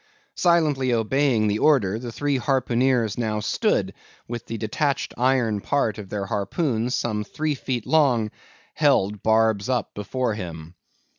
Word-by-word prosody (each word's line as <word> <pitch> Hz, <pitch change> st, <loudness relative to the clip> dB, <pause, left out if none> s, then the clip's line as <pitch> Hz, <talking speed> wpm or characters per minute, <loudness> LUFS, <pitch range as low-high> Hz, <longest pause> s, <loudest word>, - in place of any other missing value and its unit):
Silently 155 Hz, -7 st, +2 dB
obeying 120 Hz, 0 st, +2 dB
the 105 Hz, 0 st, 0 dB
order, 115 Hz, -9 st, +3 dB
the 120 Hz, -1 st, -6 dB
three 145 Hz, +3 st, -1 dB
harpooneers 125 Hz, -4 st, +1 dB
now 110 Hz, -2 st, -1 dB
stood 105 Hz, -, 0 dB, 0.3 s
with 120 Hz, -1 st, -5 dB
the 115 Hz, -, -4 dB
detached 135 Hz, +6 st, -1 dB
iron 125 Hz, -5 st, +1 dB
part 115 Hz, -6 st, 0 dB
of 100 Hz, -2 st, -9 dB
their 100 Hz, -2 st, -3 dB
harpoons, 115 Hz, -, -1 dB
some 105 Hz, -2 st, -1 dB
three 155 Hz, +7 st, -2 dB
feet 125 Hz, -4 st, -4 dB
long, 125 Hz, -9 st, +2 dB, 0.4 s
held, 100 Hz, +1 st, +2 dB
barbs 110 Hz, -1 st, +2 dB
up, 125 Hz, -2 st, -1 dB
before 120 Hz, +3 st, -2 dB
him. 85 Hz, -5 st, -7 dB
115 Hz, 140 wpm, -24 LUFS, 105-135 Hz, 0.4 s, order